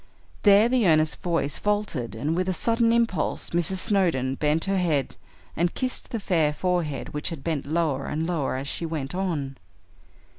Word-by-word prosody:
There 205 +2 +6
the 245 -4 +2
earnest 155 -1 +2
voice 165 -5 -1
faltered, 205 - -1
and 145 +8 -1
with 185 +1 0
a - - +1
sudden 230 +4 +2
impulse 230 -8 0
Mrs. 175 +2 +1
Snowdon 175 - +1
bent 150 +3 +1
her 195 -1 +1
head 155 -7 0 0.4
and 175 +2 0
kissed 255 -1 -3
the 230 - -3
fair 165 -7 +1
forehead 170 -4 -1
which 150 +3 -3
had 160 -6 -7
bent 155 -5 -2
lower 155 -4 0
and 155 +2 -2
lower 165 -7 -1
as 135 +2 -4
she 170 - -4
went 150 -3 -4
on. 160 -8 -2
165 Hz, 175 wpm, -25 LUFS, 150-190 Hz, 0.4 s, There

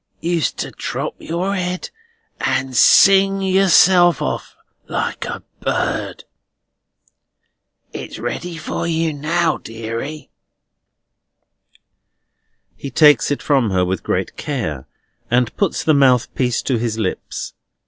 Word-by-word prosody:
Used 170 0 -1
to - - -4
drop - - -4
your 180 +4 -2
head, 180 -1 -3 0.5
and 130 -1 -1
sing 195 +9 +6
yourself 185 -2 +4
off - - -4 0.3
like - - -3
a - - -6 0.2
bird! - - -2 1.7
It's - - -7
ready 160 +9 -5
for 155 - -4
you 165 -1 0
now, 160 +3 0
deary." 115 +7 -7 2.4
He 140 - -7
takes 150 +3 +5
it 145 - -2
from 135 -6 +2
her 95 -1 +1
with 95 0 -2
great - - -2
care, 80 - -4 0.4
and 125 -1 +1
puts 200 -4 -1
the 155 - +3
mouthpiece 125 -3 +2
to 130 - 0
his 115 -1 -2
lips. 105 -5 -4
150 Hz, 110 wpm, -19 LUFS, 120-175 Hz, 2.4 s, sing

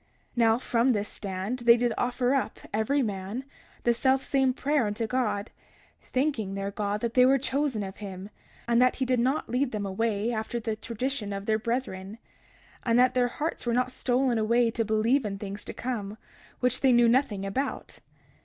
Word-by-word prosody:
31:22 - - -28
Now, 225 -1 +4
from 245 0 +2
this 205 -1 -2
stand 195 +5 -4
they 235 0 +6
did 240 -1 +1
offer 250 +1 0
up, 275 - -1
every 240 +7 +1
man, 205 +3 -4 0.4
the 240 - +4
selfsame 265 +1 +2
prayer 280 -3 +1
unto 210 +3 -2
God, 220 -4 -1 0.6
thanking 255 -8 0
their 195 0 -3
God 205 0 -2
that 235 -1 -2
they 250 - +6
were 265 +2 +5
chosen 270 -4 -1
of 190 -1 -7
him, 195 -1 -8 0.4
and 235 0 +4
that 250 0 +4
he 260 - -1
did 250 -1 +1
not 260 +5 +1
lead 250 +2 0
them 210 -2 -3
away 215 +3 -1
after 220 +2 -3
the 220 -1 -2
tradition 230 0 -4
of 200 0 -4
their 215 0 +1
brethren, 220 -4 -3 0.6
and 230 -1 +2
that 250 0 +5
their 250 -1 +3
hearts 295 +1 -4
were 235 - +2
not 250 0 +1
stolen 250 -1 +1
away 235 +2 +3
to 230 - -1
believe 225 +5 +2
in 200 -2 -3
things 200 0 -6
to - - -5
come, 220 -4 -4 0.4
which 250 0 +1
they 265 - +5
knew 240 0 +6
nothing 230 -5 +2
about. 260 +9 -3
235 Hz, 190 wpm, -27 LUFS, 210-255 Hz, 0.6 s, they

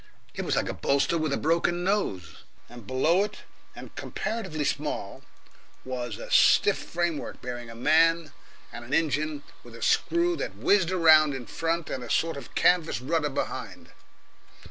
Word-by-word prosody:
It - - -4
was - - -1
like - - 0
a - - -3
bolster 140 +4 +1
with 155 -3 -1
a - - +1
broken 170 +2 +1
nose, 100 - -1 0.3
and 120 -4 -13
below 160 +9 +2
it, 210 0 -7 0.3
and - - -11
comparatively 195 -9 -4
small, 145 -8 -3 0.6
was 125 -4 -4
a - - -9
stiff - - +5
framework 170 -3 -3
bearing 120 -2 -7
a 115 - -10
man 160 +4 +3 0.4
and 120 - -8
an 125 +3 -2
engine 155 -1 0 0.2
with 120 -1 -13
a 115 - -8
screw 345 +1 +2
that - - -4
whizzed 190 -4 +2
round 155 -5 +5
in 125 -2 -6
front 165 +6 -2
and 130 - -4
a 120 - -9
sort 165 0 +1
of 140 - -10
canvas 175 -6 +2
rudder 150 +3 -1
behind. 135 - -5
155 Hz, 165 wpm, -27 LUFS, 130-170 Hz, 0.6 s, stiff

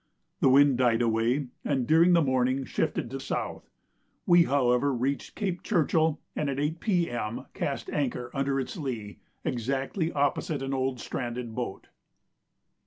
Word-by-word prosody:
The - - +4
wind 135 -1 +5
died 120 -2 +3
away, 120 +4 +1
and 135 -4 0
during 165 +5 +5
the 170 -2 +5
morning 130 0 +1
shifted 120 - -2
to 135 - -4
south. 135 - -4 0.6
We, 175 -1 +6
however, 130 0 +2
reached 135 +2 -2
Cape 190 -4 -2
Churchill, 160 -4 +2 0.2
and 150 - -1
at 135 0 -2
8 150 +3 -1
P.M. 165 - -1
cast - - -3
anchor 125 -4 -2
under 135 -1 0
its 135 - -4
lee, 120 - -5 0.3
exactly 135 - -1
opposite 145 0 0
an 135 0 -2
old 130 -1 -1
stranded 120 -1 -4
boat. 120 -5 -5
135 Hz, 145 wpm, -28 LUFS, 125-150 Hz, 0.6 s, We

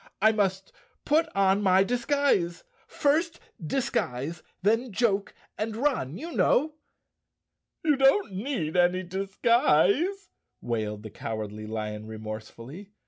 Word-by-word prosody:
"I 220 +2 +5
must 195 -3 -1 0.3
put 320 +2 +2
on 195 0 +3
my 190 -1 +5
disguise—first 280 - 0 0.2
disguise, 155 - -2 0.2
then 225 +4 +2
joke 200 -1 0 0.2
and 215 0 -2
run, 230 - -1
you 335 +3 -7
know!" 305 0 +2 1.1
"You 300 -3 +3
don't 270 - +3
need 190 - -3
any 180 +1 +3
disguise," 200 - +1 0.3
wailed 110 -3 -3
the 110 - -8
Cowardly 110 -1 -5
Lion 110 -1 -5
remorsefully. 110 - -8
195 Hz, 105 wpm, -27 LUFS, -, 1.1 s, I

